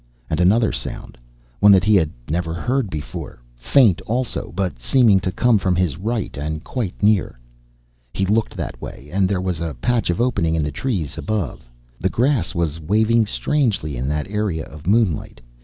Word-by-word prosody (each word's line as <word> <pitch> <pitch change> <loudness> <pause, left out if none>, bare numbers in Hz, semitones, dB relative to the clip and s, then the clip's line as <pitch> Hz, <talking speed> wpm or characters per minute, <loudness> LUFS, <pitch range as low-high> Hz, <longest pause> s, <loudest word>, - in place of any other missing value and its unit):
And 80 - 0
another 105 +5 +4
sound - - -6 0.4
one 105 - +7
that 95 -2 +5
he 110 - +3
had 85 -7 +4 0.2
never 80 +1 -2
heard 125 +4 -1
before 75 -6 -6 0.2
faint, 100 - +3
also, 120 +2 -2
but 95 -10 -2
seeming 105 - +4
to 95 - -2
come 115 +2 +3
from 95 -1 +1
his 90 -6 +1
right 110 +4 -3
and 75 +2 -4
quite 110 -7 -4
near. 105 - +2 0.7
He 95 - -1
looked 110 +3 0
that - - -5
way, 70 - -9
and 95 -1 +2
there 100 -2 0
was 90 -3 -2
a 80 -4 -3
patch 120 - 0
of 85 - 0
opening 100 -10 +1
in 80 - 0
the 75 - -2
trees 90 - -3
above. 100 - -3 0.3
The 95 - +1
grass 125 - +1
was 85 -2 -1
waving 110 +6 +2
strangely 110 - 0
in 65 +2 -3
that 75 +3 -1
area 100 -6 -2
of 75 +3 -12
moonlight. 100 - +1
95 Hz, 180 wpm, -21 LUFS, 80-110 Hz, 0.7 s, one